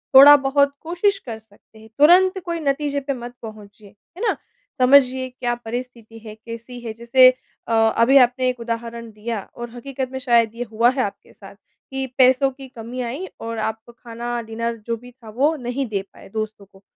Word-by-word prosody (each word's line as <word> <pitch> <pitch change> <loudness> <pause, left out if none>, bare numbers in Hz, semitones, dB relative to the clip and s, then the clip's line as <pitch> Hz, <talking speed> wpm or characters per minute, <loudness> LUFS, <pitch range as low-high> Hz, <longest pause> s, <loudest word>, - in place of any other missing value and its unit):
थोड़ा-बहुत 280 0 +7
कोशिश 355 +5 0
कर 230 -9 -8
सकते 220 0 -23
हैं, 220 0 -15
तुरंत 370 +5 +6
कोई 340 -1 -3
नतीजे 285 -1 -1
पर 275 0 -3
मत 240 0 -8
पहुँचिए। 210 -2 -12 0.3
है - - -8
ना? - - 0 0.4
समझिए 260 0 +5
क्या 245 -1 -3
परिस्थिति 240 -1 -7
है, 220 -1 -10
कैसी 230 +2 -9
है। 225 - -4
जैसे 240 +3 +6 0.4
अ, 230 - -1 0.2
अभी 250 +4 +5
आपने 255 +1 +2
एक 250 -1 -4
उदाहरण 230 0 -5
दिया, 215 +1 -4 0.2
और 240 0 -7
हकीकत 260 +1 -5
में 265 - -5
शायद 235 -4 +3
ये 240 - -3
हुआ 230 +2 +4
है - - +2
आपके 200 - -7
साथ, - - -14 0.4
कि 270 0 -2
पैसों 260 +1 +5
की 270 0 -12
कमी 245 0 -7
आई 255 +9 -4 0.2
और 230 0 -5
आप 220 0 -2
खाना, 235 0 -6
डिनर 230 +1 -4
जो 230 0 -1
भी 245 +2 -14
था, 240 -3 -15
वो 280 +9 +1
नहीं 255 0 -3
दे 200 -2 -1
पाए - - -15
दोस्तों 215 -1 -5
को। 195 0 -22
240 Hz, 190 wpm, -21 LUFS, 225-270 Hz, 0.4 s, थोड़ा-बहुत